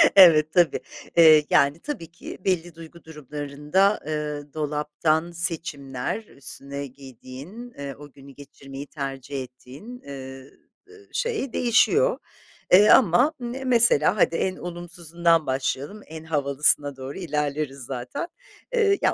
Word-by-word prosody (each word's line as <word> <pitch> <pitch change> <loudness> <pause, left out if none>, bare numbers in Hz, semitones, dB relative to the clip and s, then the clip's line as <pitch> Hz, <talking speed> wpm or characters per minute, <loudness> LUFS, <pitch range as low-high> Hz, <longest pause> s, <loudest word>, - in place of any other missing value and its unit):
Evet, 155 -5 +7
tabii, 175 -3 +3 0.4
eee, 155 -2 +8
yani, 140 +3 +3
tabii 280 - -6
ki, 170 - -10
belli 175 -3 -1
duygu 165 +1 -13
durumlarında, 150 +5 -1
ııı, 150 -2 -4
dolaptan 155 +2 -1
seçimler, 165 - -4
üstüne 140 -2 -8
giydiğin, 135 - -11
eee, 140 -1 -6
o 145 -1 -12
günü 140 0 -15
geçirmeyi 140 0 -11
tercih 135 -1 -5
ettiğin, 135 - -12
eee, 135 -1 -9 0.4
eee, 420 -1 -17
şey 460 - -2
değişiyor, 425 - +3 0.5
eee, 200 +4 +7
ama, 250 - +5
ımm, 240 0 -4
ne 265 +1 -6
mesela 230 - +4
hadi 170 - +3
en 185 +1 -1
olumsuzundan 170 -1 -1
başlayalım, 135 +9 -2
en 160 0 -9
havalısına 145 -2 +1
doğru 135 +1 -7
ilerleriz 150 -4 -2
zaten. 125 - -5 0.5
Eee, 415 -4 +3
ya - - +3
155 Hz, 125 wpm, -24 LUFS, 140-180 Hz, 0.5 s, eee